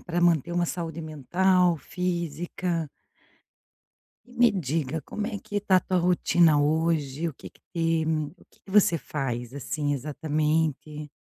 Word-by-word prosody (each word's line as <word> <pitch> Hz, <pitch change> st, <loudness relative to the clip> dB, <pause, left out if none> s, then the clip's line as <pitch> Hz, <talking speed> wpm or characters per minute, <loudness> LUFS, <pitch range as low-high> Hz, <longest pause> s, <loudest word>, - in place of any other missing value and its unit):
para 175 Hz, -1 st, -2 dB
manter 170 Hz, -2 st, +3 dB
uma 175 Hz, 0 st, +1 dB
saúde 165 Hz, -2 st, -4 dB
mental, 175 Hz, +4 st, +2 dB
física. 170 Hz, -1 st, -3 dB, 1.4 s
E 245 Hz, -, -18 dB
me 240 Hz, -1 st, +5 dB
diga, 160 Hz, -4 st, -2 dB
como 210 Hz, 0 st, -4 dB
é 215 Hz, -4 st, -4 dB
que 205 Hz, -, -6 dB
está 200 Hz, -2 st, +3 dB
a -, -, +4 dB
tua 185 Hz, +1 st, 0 dB
rotina 170 Hz, -3 st, +4 dB
hoje? 155 Hz, 0 st, +1 dB
O 155 Hz, -, -8 dB
que -, -, -11 dB
que -, -, -27 dB
tem 165 Hz, -1 st, +1 dB, 0.2 s
o 170 Hz, +5 st, -15 dB
que -, -, -26 dB
que -, -, -13 dB
você 190 Hz, -4 st, +5 dB
faz, 125 Hz, -6 st, -4 dB
assim, 145 Hz, +1 st, -2 dB
exatamente? 150 Hz, +1 st, -1 dB
165 Hz, 150 wpm, -26 LUFS, 150-180 Hz, 1.4 s, me